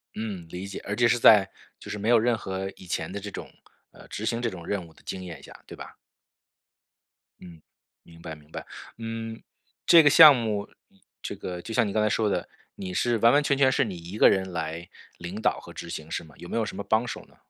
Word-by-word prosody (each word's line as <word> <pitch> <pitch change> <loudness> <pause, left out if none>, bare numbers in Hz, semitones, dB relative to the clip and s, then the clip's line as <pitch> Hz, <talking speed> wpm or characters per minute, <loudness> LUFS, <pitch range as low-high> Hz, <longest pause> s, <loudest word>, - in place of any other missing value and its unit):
嗯， 105 -6 -5
理 90 +3 -6
解， - - -7
而 100 - -3
且 120 0 +4
是 120 +1 +3
在 105 -4 +6 0.3
就 - - -11
是 105 - -4
没 105 +3 -2
有 120 -2 +6
任 120 0 +1
何 95 -1 -4
以 95 - -14
前 85 -1 -3
的 100 - -5
这 100 0 -7
种， - - -8 0.4
呃 - - -16
执 110 - -5
行 115 +1 -1
这 115 - 0
种 85 -4 -10
任 100 -4 -2
务 80 - -19
的 - - -22
经 95 -1 -5
验 80 -6 -9
下， - - -13
对 - - -10
吧？ - - -11 1.4
嗯， 85 -3 -13 0.4
明 85 0 -17
白 80 -2 -7
明 75 +1 -20
白， - - -7 0.3
嗯 115 0 -6 0.4
这 165 -2 +8
个 145 - +6
项 150 -2 +10
目， 110 -4 -2 0.5
这 - - -5
个 90 -1 -6
就 115 - -7
像 115 -3 +2
你 - - -3
刚 110 - +2
才 110 - +2
说 110 -1 +1
的， - - -2 0.3
你 90 -1 -6
是 120 +4 +1
完 115 +3 +5
完 145 +1 +4
全 140 -1 +1
全 130 -2 +4
是 140 - +2
你 95 -4 -5
一 85 +5 -8
个 - - +7
人 95 -1 0
来 85 +1 -5 0.3
领 90 +5 -7
导 - - +1
和 - - -12
执 85 - -8
行 80 -1 -7
是 - - -3
吗？ 75 -4 -17
有 85 - -10
没 - - -4
有 110 - +1
什 - - -7
么 100 - -4
帮 110 +4 +1
手 125 - -7
呢？ - - -24
100 Hz, 265 characters per minute, -26 LUFS, 90-115 Hz, 1.4 s, 项